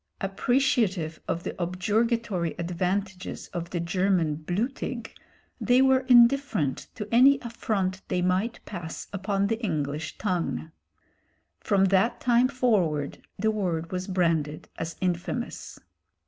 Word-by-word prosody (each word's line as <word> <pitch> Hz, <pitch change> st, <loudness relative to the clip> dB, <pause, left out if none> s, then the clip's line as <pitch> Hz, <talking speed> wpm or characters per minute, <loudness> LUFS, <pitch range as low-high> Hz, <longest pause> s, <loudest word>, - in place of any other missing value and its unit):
Appreciative 195 Hz, -, +1 dB
of 170 Hz, -, -2 dB
the -, -, -4 dB
objurgatory 200 Hz, 0 st, 0 dB
advantages 180 Hz, +2 st, -3 dB
of 170 Hz, -1 st, -5 dB
the 175 Hz, -, -2 dB
German 175 Hz, -2 st, +1 dB
blutig, 225 Hz, -, -3 dB, 0.5 s
they 245 Hz, +1 st, +4 dB
were 265 Hz, 0 st, +5 dB
indifferent 240 Hz, -, +4 dB
to 210 Hz, -, -5 dB
any 265 Hz, +4 st, +7 dB
affront 200 Hz, -5 st, -2 dB
they 180 Hz, -, 0 dB
might 190 Hz, +6 st, 0 dB
pass 175 Hz, -5 st, -6 dB
upon 195 Hz, 0 st, 0 dB
the 225 Hz, +3 st, -2 dB
English 150 Hz, -5 st, -2 dB
tongue. 175 Hz, -4 st, -2 dB, 0.9 s
From 195 Hz, -2 st, +2 dB
that 195 Hz, +5 st, +3 dB
time 245 Hz, 0 st, +4 dB
forward 200 Hz, -, 0 dB, 0.2 s
the 220 Hz, +3 st, +1 dB
word 175 Hz, -6 st, -2 dB
was 185 Hz, 0 st, -3 dB
branded 165 Hz, -5 st, 0 dB
as 165 Hz, 0 st, -5 dB
infamous. 185 Hz, +6 st, -3 dB
190 Hz, 120 wpm, -27 LUFS, 170-230 Hz, 0.9 s, any